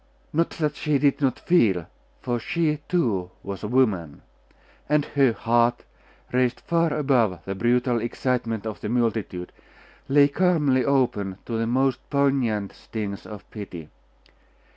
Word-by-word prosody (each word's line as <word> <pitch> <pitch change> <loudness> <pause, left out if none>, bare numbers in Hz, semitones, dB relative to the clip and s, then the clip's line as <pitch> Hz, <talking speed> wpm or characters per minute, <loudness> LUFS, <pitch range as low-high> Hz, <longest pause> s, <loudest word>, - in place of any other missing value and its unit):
Not 165 +2 +2
that 150 -2 0
she 150 -1 +1
did 140 0 +2
not 130 -3 +1
feel; 105 - +2 0.4
for 120 -1 -1
she, 150 +4 0
too, 110 - 0
was 100 +1 -6
woman; 105 - 0 0.7
and 150 -1 +3
her 135 -3 +3
heart, 120 +1 +1 0.5
raised 125 0 +2
far 170 -2 +1
above 130 -11 +1
the 95 - -3
brutal 120 +3 +1
excitement 120 -2 -2
of 110 -2 -5
the 105 - -3
multitude, 110 -7 -1 0.6
lay 140 +1 +6
calmly 145 -5 +2
open 120 -9 +1
to 115 - -4
the 115 0 0
most 130 +1 +1
poignant 135 -8 +1
stings 105 -3 -6
of 105 -2 -10
pity. 90 -7 -8
120 Hz, 135 wpm, -24 LUFS, 105-140 Hz, 0.7 s, lay